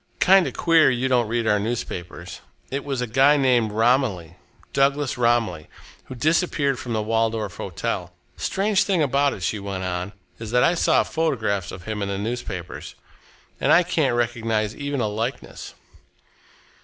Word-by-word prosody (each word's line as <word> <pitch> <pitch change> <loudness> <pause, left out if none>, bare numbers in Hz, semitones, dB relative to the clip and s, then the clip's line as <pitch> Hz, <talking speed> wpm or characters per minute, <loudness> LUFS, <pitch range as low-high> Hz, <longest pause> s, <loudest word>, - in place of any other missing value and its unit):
"Kind 190 0 +5
of - - -5
queer 165 -4 +4
you 130 0 0
don't 125 -3 +2
read 115 +1 -1
our 105 -2 +2
newspapers! 90 -6 -5 0.3
It 135 +1 -3
was 135 -3 -3
a - - 0
guy 135 +6 +4
named 125 -5 +2
Romilly 110 - +1 0.4
Douglas 140 0 +1
Romilly 115 -10 0 0.4
who 130 - -9
disappeared 145 -2 +1
from 120 - -5
the 110 -1 -1
Waldorf 110 -2 -1
Hotel. - - -4 0.2
Strange 200 +1 0
thing 190 -5 +1
about 140 0 +2
it," 95 - -8
she 105 +4 -1
went 100 -1 -5
on, 90 +2 -3 0.3
"is 115 -1 -6
that 125 +2 +3
I 170 - +4
saw 170 - +3
photographs 110 - -1
of 90 - -9
him 110 +1 -4
in 100 - -1
the 100 - -2
newspapers, 100 -5 -5 0.6
and - - +2
I 180 - +6
can't 155 -8 0
recognise 115 -3 -1
even 140 -2 -3
a 110 - 0
likeness." 115 +5 -5
120 Hz, 165 wpm, -23 LUFS, 105-140 Hz, 0.6 s, I